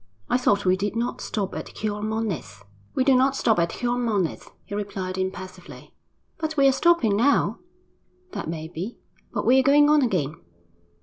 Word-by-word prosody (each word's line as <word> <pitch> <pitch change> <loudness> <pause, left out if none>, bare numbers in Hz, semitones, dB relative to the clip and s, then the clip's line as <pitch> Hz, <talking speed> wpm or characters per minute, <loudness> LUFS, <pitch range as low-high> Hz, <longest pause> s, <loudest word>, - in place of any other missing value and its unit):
'I - - +4
thought 205 -5 +2
we 185 0 +4
did 205 +3 -3
not 235 +2 -2
stop 200 -3 -3
at - - -5
Xiormonez.' 210 - -4 0.3
'We 260 - +3
do 270 0 +4
not 265 +2 +3
stop 225 -7 +2
at 170 0 +2
Xiormonez,' 235 -7 -1 0.2
he - - -9
replied 195 -2 -4
impassively. 185 -1 -6 0.5
'But 315 -1 -3
we 275 -1 +6
are - - +6
stopping 265 -8 +3
now!' 260 +7 +2 0.7
'That 160 - -5
may 160 -1 -4
be; 180 +8 -6 0.3
but - - -3
we 260 +2 +6
are - - +5
going 290 +2 +5
on 300 -1 +5
again.' 165 - 0
215 Hz, 170 wpm, -24 LUFS, 185-255 Hz, 0.7 s, we